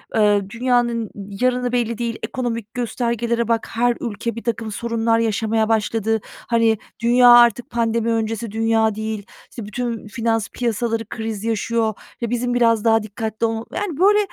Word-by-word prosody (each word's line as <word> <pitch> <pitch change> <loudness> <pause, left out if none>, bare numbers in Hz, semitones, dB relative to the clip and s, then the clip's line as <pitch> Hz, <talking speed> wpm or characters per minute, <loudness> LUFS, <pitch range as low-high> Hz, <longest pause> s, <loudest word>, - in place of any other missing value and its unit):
eee, 210 -2 +4
dünyanın 235 -2 0
yarını 245 +5 -1
belli 235 -2 0
değil, 235 -1 -3
ekonomik 230 -4 -3
göstergelere 235 -1 -1
bak, 230 -1 0
her 240 +1 +2
ülke 235 0 -4
birtakım 230 -1 -3
sorunlar 230 +1 0
yaşamaya 220 0 +1
başladı, 225 0 +1 0.3
hani, 230 -2 +3 0.2
dünya 245 +1 +5
artık 240 -1 +6
pandemi 230 -1 0
öncesi 225 0 -2
dünya 225 0 +2
değil, 220 -1 -4 0.2
işte, 230 - -8
bütün 230 +1 -4
finans 225 -1 -1
piyasaları 230 -1 -1
kriz 220 -2 -4
yaşıyor 225 0 0 0.3
ve 235 - -1
bizim 245 +1 -1
biraz 230 -3 +3
daha 225 -1 +4
dikkatli 220 +1 -3
ol" 225 0 -2
Yani, 370 -7 -3
böyle, 415 +2 +5
230 Hz, 145 wpm, -21 LUFS, 220-235 Hz, 0.3 s, artık